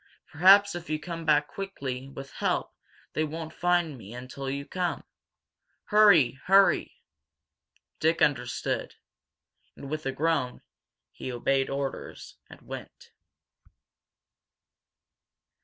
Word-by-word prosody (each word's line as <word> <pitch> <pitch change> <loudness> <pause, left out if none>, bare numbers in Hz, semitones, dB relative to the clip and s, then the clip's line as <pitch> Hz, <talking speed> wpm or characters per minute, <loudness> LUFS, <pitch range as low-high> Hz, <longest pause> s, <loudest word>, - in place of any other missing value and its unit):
Perhaps 200 +4 +6
if 175 -2 -7
you 155 0 -1
come 165 0 -6
back 150 -1 +3
quickly 135 -10 -6
with 135 0 -9
help - - -1 0.4
they 155 - 0
won't 160 +1 -5
find 175 -6 +1
me 110 +2 -10
until 130 +2 -6
you 140 +1 -4
come! 180 +1 -2 0.8
Hurry 180 - +5
hurry!" 195 +1 +3 1.0
Dick 160 +1 +2
understood. 125 -4 0 0.8
And, 140 - -9
with 155 -2 -3
a - - 0
groan, 145 -2 -1 0.5
he 130 - -6
obeyed 135 +2 0
orders, 135 -1 -5
and - - -14
went. - - -10
150 Hz, 105 wpm, -28 LUFS, 135-175 Hz, 1.0 s, Perhaps